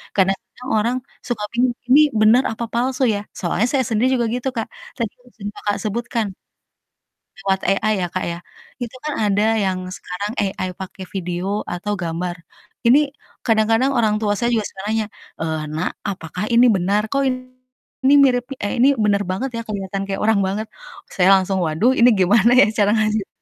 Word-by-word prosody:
kadang-kadang 195 +6 -1
orang 235 +4 +1 0.3
suka 230 -4 -2
bingung 245 +1 +3 0.2
ini 265 +4 +6 0.2
bener 225 +4 +6
apa 230 +1 -4
palsu 255 +3 0
ya? - - -2 0.2
Soalnya 190 +5 0
saya 265 -3 +1
sendiri 230 +3 +2
juga 235 - +1
gitu, 250 +2 -2
Kak, 225 - -1 0.3
tadi 230 -3 -1
yang 250 - -20
sudah, 205 -1 -5
Kakak, 205 -1 -1
sebutkan 230 +1 -2 1.2
lewat 195 -1 +1
AI 215 +2 +2
ya, - - -8
Kak, 185 - -1
ya 170 - -4 0.4
itu 240 +1 -5
kan 300 - -1
ada 205 0 +2 0.2
yang 190 -1 0 0.2
sekarang 200 +4 -5
AI 190 -1 -2
pake 190 +1 -8
video 185 +3 -2
atau 205 +4 -3
gambar, 175 +1 -3 0.5
ini 245 +4 +7 0.5
kadang-kadang 225 +3 +3
orang 215 -3 +3
tua 205 -2 +1
saya 240 0 +1
juga 215 -3 0
suka 190 - -9
nanya, 220 -1 0 0.3
eee, 160 -1 -2
"Nak 160 +3 -1 0.2
apakah 180 0 -5
ini 235 +2 +6
benar 195 +3 +1
kok 275 - +1
ini 255 +1 -2
mirip 245 -2 +2 0.2
eh, 205 - -1
ini 265 - +7 0.2
bener 205 -1 +2
banget 245 +9 -2
ya 230 - -3
kelihatan 195 -2 -4
kayak 195 0 -3
orang 220 -2 +3
banget?" 205 +3 -2 0.5
Saya 185 -1 +3
langsung 190 0 -1
waduh 160 +11 +2
ini 240 +1 +7
gimana 205 +5 +4
ya - - +7
cara 205 -1 +4
ngajarinnya 215 -2 +1
210 Hz, 175 wpm, -20 LUFS, 190-240 Hz, 1.2 s, ini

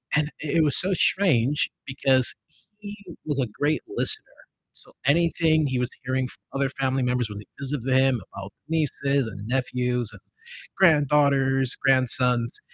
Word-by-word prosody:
and 150 0 +1
i - - -4
it 160 - +4
was 150 - +4
so 190 +1 +3
strange 150 - +2 0.2
because 130 -1 +2 0.5
he 205 0 -8 0.3
was 145 -3 -1
a 125 - 0
great 150 +2 +1
listener, 435 +1 +3 0.5
so - - -18
anything 160 0 +2
he 130 -1 -2
was 125 0 -2
hearing 130 0 -1
from - - -14 0.2
other 135 0 0
family 135 -1 -1
members 125 -2 -1
when 105 -1 -7
they 105 - -12
visited 135 -2 -2
him 130 -4 +2
about 95 +1 -8 0.2
nieces 140 -4 0
and 105 -1 -8
nephews 125 -2 -1
and - - -14 0.6
granddaughters, 140 -5 +3
grandsons, 125 -2 +1
135 Hz, 150 wpm, -24 LUFS, 125-150 Hz, 0.6 s, it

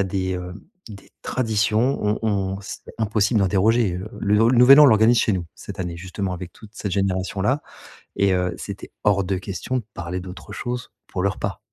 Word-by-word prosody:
a 100 - +2
des, 95 0 -2
hem, 90 0 -6 0.3
des 100 -3 -12
traditions, 110 +2 +1
on 105 +1 +1
on 100 -2 -1
c'était 95 - -9
impossible 110 0 +1
de 95 - +3
déroger, 105 +2 +2
heu, 95 +4 -5
le 105 +1 +2
nou 115 +2 +5
le 125 - +3
Nouvel 135 +4 +9
An - - +10
on - - +9
l'organise 115 0 +5
chez 110 - +2
nous, 90 -3 -2
cette - - -9
année, 90 -2 -4
justement 95 +2 -4
avec 90 0 -7
toute 110 - -15
cette 100 - -4
génération-là 95 +7 0 0.5
et 100 -1 +2
heu, 90 -1 0
c'était - - -8
hors 100 -2 +3
de 95 +1 -1
question 100 +7 -3
de 125 - -3
parler 85 +2 -4
d'autre 95 +3 -9
chose 125 +2 -5 0.2
pour 90 - -3
le 100 - +3
repas. 95 - -4
100 Hz, 210 wpm, -22 LUFS, 95-110 Hz, 0.5 s, An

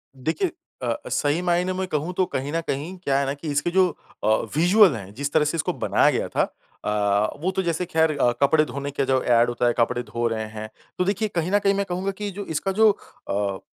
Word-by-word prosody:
देखिए 160 - -1 0.3
अ - - -3
अ, 295 - -4
सही 145 +4 +1
मायने 180 +1 +1
में 190 0 -2
कहूँ 155 +2 -2
तो 185 +1 +2
कहीं 135 +2 -2
न 165 - 0
कहीं 155 +7 -3
क्या 135 0 +2
है 140 - 0
ना 135 - -1
कि 145 +3 -9
इसके 145 +4 0
जो 185 0 +4 0.4
अ, - - +1 0.3
विजुअल 180 - +6
हैं 100 -2 -8
जिस 145 +5 -3
तरह 150 -1 +4
से 150 - -1
इसको - - 0
बनाया - - +3
गया - - -2
था - - +1 0.4
अ, 105 +2 +1
वो 185 +3 0
तो 190 - -1
जैसे 170 0 -1
खैर 160 -3 +1
अ, 120 -2 +4
कपड़े 155 +2 +4
धोने 140 0 -5
का 140 - -1
जो 130 -1 +2
एड 120 0 +4
होता 120 0 0
है 120 - +3
कपड़े 120 +1 +1
धो 120 0 -2
रहे 110 -1 -2
हैं। 110 0 -7 0.3
तो 180 - +2
देखिए 205 +2 0
कहीं 170 +2 0
न 205 - +4
कहीं 200 0 +2
मैं 200 0 0
कहूँगा 185 +2 -1
कि 205 -1 -3
जो 200 +1 -6
इसका 165 +5 -2
जो 215 +2 +5 0.4
अ, 100 -1 -1
155 Hz, 245 wpm, -24 LUFS, 125-185 Hz, 0.4 s, विजुअल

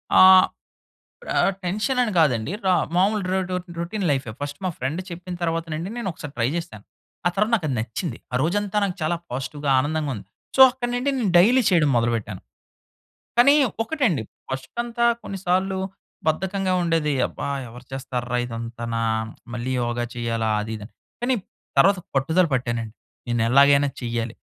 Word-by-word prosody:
ఆ! - - +8 1.0
ఇప్పుడు - - -8
ఆహ్, 195 - +3
టెన్షన్ 210 +8 -1
అని 230 -3 0
కాదండి. 130 -6 +2
ర - - +2 0.3
మామూలు 200 +3 +3
ర - - +2 0.4
రొటీన్ 185 +4 -3
లైఫే. 135 -5 -1
ఫస్ట్ 145 0 -5
మా - - +1
ఫ్రెండ్ 140 +7 -2
చెప్పిన 180 +1 -6
తర్వాత 165 -1 0
నుండి 160 +4 -3
నేను 235 -5 -3
ఒకసారి 150 -3 -9
ట్రై 115 - +1
చేశాను. 165 -12 -6 0.4
ఆ - - +7
తర్వాత 210 +3 +2
నాకు 190 -9 0
అది 130 - -1
నచ్చింది. 115 - -4
ఆ - - +1
రోజంతా 205 +5 0
నాకు 185 -3 -2
చాలా 165 +3 +1
పాజిటివ్‌గా 140 +3 -3
ఆనందంగా 150 +2 -1
ఉంది. 100 -2 -10 0.3
సో, - - +2
అక్కడినుండి 245 +1 -1
నేను 230 -7 0
డైలీ 240 +9 +5
చేయడం 165 -5 +4
మొదలుపెట్టాను. 115 -4 -1 1.0
కానీ 275 +4 +7 0.3
ఒకటండి 230 - 0 0.3
ఫస్టుకంతా 235 - -3 0.2
కొన్నిసార్లు 190 0 -1 0.5
బద్ధకంగా 190 +3 0
ఉండేది. 165 -3 +1
అబ్బా! - - -6 0.2
ఎవరు 120 +2 -12
చేస్తార్రా 125 -2 -3
ఇదంతనా, 115 -1 -4 0.5
మళ్ళీ 125 +2 -3
యోగ 120 0 -2 0.2
చెయ్యాలా 115 -2 -1
అది 110 +1 -5
ఇది 105 - -9
అని. - - -22 0.3
కానీ 255 +2 +2 0.4
తరువాత 195 -1 +6 0.2
పట్టుదల 160 +7 +3
పట్టానండి. 120 -3 -2 0.3
నేను 120 -1 +1
ఎలాగైనా 140 +2 +6
చెయ్యాలి. 115 -1 -2
155 Hz, 150 wpm, -23 LUFS, 120-195 Hz, 1.0 s, ఆ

